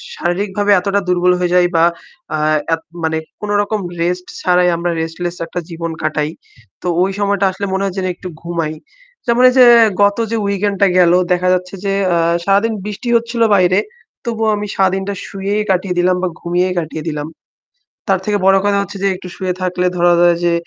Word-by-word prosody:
শারীরিকভাবে 200 +3 -1
এতটা 200 +2 0
দুর্বল 180 0 +3
হয়ে 180 0 0
যাই 180 -1 +5
বা 165 - +4 0.5
আ - - -1 0.4
এত 165 - -1 0.2
মানে 160 0 0 0.2
কোন 210 - -5
রকম 210 +1 -2 0.2
rest 180 +1 -1
ছাড়াই 180 -1 +3
আমরা 170 +1 -2
restless 170 +2 -4
একটা 170 - -5
জীবন 165 0 -5
কাটাই। 150 0 -1 0.5
তো - - -5
ঐ - - +5 0.2
সময়টা 200 -1 +1
আসলে 190 +2 -5
মনে 190 +1 0
হয় 190 -1 -3
যেন 190 - -1
একটু 185 - -9
ঘুমাই। 170 -2 -3 0.5
যেমন 235 +1 +3
এই - - -1
যে 250 - +9 0.4
গত 200 +1 +3
যে 230 - 0
weekend 200 0 0
টা 200 - +6
গেল 175 -2 +5 0.2
দেখা 180 0 0
যাচ্ছে 180 +1 -3
যে, 195 - 0 0.2
আ - - +2 0.3
সারাদিন 200 +3 +2
বৃষ্টি 210 +3 -5
হচ্ছিল 235 0 -4
বাইরে 185 0 +3 0.5
তবুও 225 -2 0
আমি 210 0 -4
সারাদিনটা 190 +1 0
শুয়েই 200 +2 -2
কাটিয়ে 185 -1 -1
দিলাম 180 +1 +3
বা - - +2
ঘুমিয়েই 180 +1 0
কাটিয়ে 160 -1 -6
দিলাম। 150 -1 -4 0.8
তার 190 - +3
থেকে 210 -1 +1
বড় 195 0 +6
কথা 200 0 +2
হচ্ছে 200 0 -6
যে - - +3
একটু 180 - -10
শুয়ে 185 -1 -2
থাকলে 180 0 -1
ধরা 175 0 +4
যাক 175 0 +5
যে 170 - +2
185 Hz, 190 wpm, -16 LUFS, 175-200 Hz, 0.8 s, যে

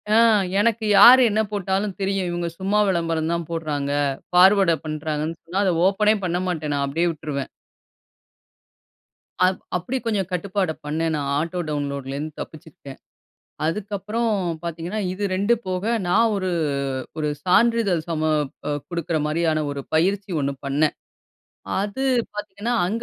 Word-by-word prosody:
ஆ - - +6 0.4
எனக்கு 225 0 +1
யார் 250 +2 +10
என்ன 215 - 0
போட்டாலும் 195 -1 -1
தெரியும். 195 -1 0
இவங்க 175 0 -2
சும்மா 200 +2 +1
விளம்பரம் 165 -2 0
தான் 170 -2 -3
போடுறாங்க, 150 -4 -2 0.4
ஃபார்வர்ட் 190 0 +6
பண்றாங்கன்னு 155 +1 -3
சொன்னா, 185 +4 -3
அத 185 - +2
ஓப்பனே 210 +2 +3
பண்ண 175 0 0
மாட்டேன். 155 -4 -2
நான் 140 -1 0
அப்டியே 165 +5 +1
விட்டுருவேன். 145 -3 -5 1.9
அ - - +7 0.3
அப்படி 180 +9 -3
கொஞ்சம் 200 -5 0
கட்டுப்பாடு 185 -1 -1
பண்ணேன். 160 +2 -1
நான் 140 -1 -2
ஆட்டோ 170 +4 -2
டவுன்லோட்லேந்து 140 0 -3
தப்பிச்சிருக்கேன். 145 -3 -10 0.7
அதுக்கப்புறம் 210 +6 -2 0.3
பார்த்தீங்கன்னா, 170 +5 -4
இது 205 +2 -5
2 200 +5 +2
போக 185 0 -2 0.2
நான் 225 +5 +4
ஒரு 185 -2 -1 0.7
ஒரு 150 -1 0
சான்றிதழ் 205 -2 +3
சம 160 -2 -1 0.7
குடுக்கிற 170 -2 -2
மாரியான 155 0 +1
ஒரு 140 -1 -4
பயிற்சி 190 +5 +1
ஒண்ணு 140 0 -1
பண்ணேன். 145 +3 +1 0.9
அது 205 +6 -3 0.3
பார்த்தீங்கன்னா 210 +3 -4
அங்க 225 +5 -2
175 Hz, 130 wpm, -23 LUFS, 155-200 Hz, 1.9 s, யார்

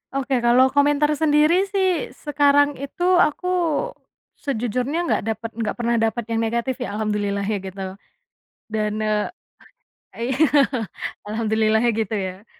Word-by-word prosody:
Oke 270 -1 0
kalau 245 +2 +4
komentar 290 +1 +3
sendiri 315 +5 +3
sih 380 -5 0 0.2
sekarang 290 -1 +3
itu 280 +5 -5 0.2
aku, 355 +3 +1 0.9
sejujurnya 250 +4 -2
nggak 345 - 0
dapat 230 +1 -7
nggak 220 - -1
pernah 235 0 0
dapat 225 +1 0
yang 225 - +1
negatif 235 +3 -1
ya 225 -5 -4
alhamdulillahnya 210 -1 -1
gitu. 190 0 -6 0.8
Dan 215 -1 -2
e 215 -1 0 0.8
iya 250 +3 -2 0.9
alhamdulillahnya 220 +1 +1
gitu 225 -2 -1
ya. 190 0 -4
235 Hz, 120 wpm, -22 LUFS, 215-285 Hz, 0.9 s, kalau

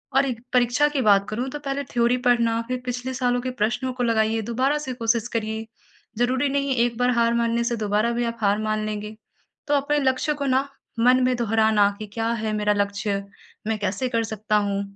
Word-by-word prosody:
और 270 -1 +3 0.2
परीक्षा 250 +4 +3
की 290 -2 -1
बात 200 -3 +4
करूँ 245 +5 -3
तो 295 - -6
पहले 280 0 -3
थ्योरी 240 +1 +3
पढ़ना 230 -1 +3
फिर 255 0 -3
पिछले 250 +1 -3
सालों 245 -1 0
के 255 - -3
प्रश्नों 240 +4 0
को 250 -1 -2
लगाइए 225 -1 +1
दोबारा 265 +5 +1
से 265 -3 -5
कोशिश 230 -1 0
करिए 220 0 -2 0.5
ज़रूरी 255 +3 +2
नहीं 280 -1 0
एक 235 -1 -3
बार 245 0 +3
हार 235 -1 +2
मानने 235 0 +1
से 235 0 0
दोबारा 215 +2 +1
भी 240 0 -1
आप 230 0 -3
हार 200 0 +3
मान 215 0 -1
लेंगे 210 0 -5 0.5
तो 290 - +1
अपने 290 +1 +1
लक्ष्य 265 +2 +1
को - - 0
न 260 +1 +3 0.4
मन 250 +2 +5
में 255 0 +2
दोहराना 220 -2 +3
कि 215 - -5
क्या 225 0 -1
है 220 - -1
मेरा 210 0 +1
लक्ष्य, 200 0 -1 0.4
मैं 220 - 0
कैसे 205 +6 -1
कर 230 -1 0
सकता 215 -1 -1
हूँ 200 -1 0
235 Hz, 205 wpm, -23 LUFS, 215-255 Hz, 0.5 s, मन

